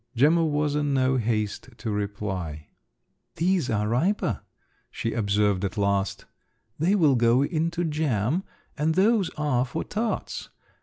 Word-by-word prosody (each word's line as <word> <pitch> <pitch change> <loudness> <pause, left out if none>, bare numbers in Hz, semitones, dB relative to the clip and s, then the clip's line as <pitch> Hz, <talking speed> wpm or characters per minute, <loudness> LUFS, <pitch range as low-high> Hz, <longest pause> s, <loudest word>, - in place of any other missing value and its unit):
Gemma 155 +7 +4
was 150 -2 +1
in 145 -1 0
no 130 0 +2
haste 110 0 -1
to 110 - -4
reply. 95 -7 -4 0.7
"These 175 -3 +1
are 105 -1 0
riper," 160 - 0 0.5
she 115 - -3
observed 100 -3 +1
at 100 +2 -3
last, 100 -1 0 0.5
"they 180 +6 +3
will 155 -8 +4
go 120 +2 +4
into 170 +3 -1
jam, 150 - 0 0.3
and 160 +2 0
those 200 0 +3
are 145 -5 +1
for 125 - -4
tarts. 220 +1 -3
130 Hz, 135 wpm, -26 LUFS, 105-160 Hz, 0.7 s, Gemma